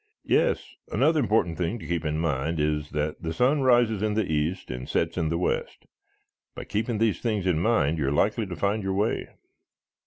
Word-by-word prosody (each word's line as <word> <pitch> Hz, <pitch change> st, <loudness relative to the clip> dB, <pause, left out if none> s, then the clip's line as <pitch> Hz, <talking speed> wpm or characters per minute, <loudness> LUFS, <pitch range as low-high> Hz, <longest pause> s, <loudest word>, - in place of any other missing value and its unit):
"Yes. -, -, +2 dB, 0.2 s
Another 160 Hz, -1 st, +3 dB
important 105 Hz, -, +1 dB
thing 90 Hz, +6 st, -1 dB
to -, -, -10 dB
keep 85 Hz, -1 st, -2 dB
in 75 Hz, 0 st, -1 dB
mind 80 Hz, 0 st, -1 dB
is 75 Hz, 0 st, 0 dB
that 75 Hz, 0 st, -3 dB
the 80 Hz, -, -3 dB
sun 135 Hz, -, +3 dB
rises 120 Hz, -5 st, +3 dB
in 105 Hz, -1 st, 0 dB
the 110 Hz, -2 st, +1 dB
east 80 Hz, +2 st, -2 dB
and 60 Hz, +1 st, -6 dB
sets 80 Hz, 0 st, 0 dB
in 80 Hz, -3 st, 0 dB
the 85 Hz, -, 0 dB
west. 90 Hz, -, -2 dB, 0.7 s
By -, -, -6 dB
keeping 110 Hz, +2 st, -2 dB
these 110 Hz, -5 st, +1 dB
things 105 Hz, -5 st, -1 dB
in 90 Hz, -4 st, +2 dB
mind 85 Hz, -7 st, +2 dB
you 70 Hz, -, 0 dB
are -, -, +1 dB
likely 105 Hz, +8 st, +1 dB
to 90 Hz, -, -5 dB
find 100 Hz, +3 st, 0 dB
your 95 Hz, -1 st, -2 dB
way." 105 Hz, +3 st, 0 dB
90 Hz, 205 wpm, -26 LUFS, 80-110 Hz, 0.7 s, Another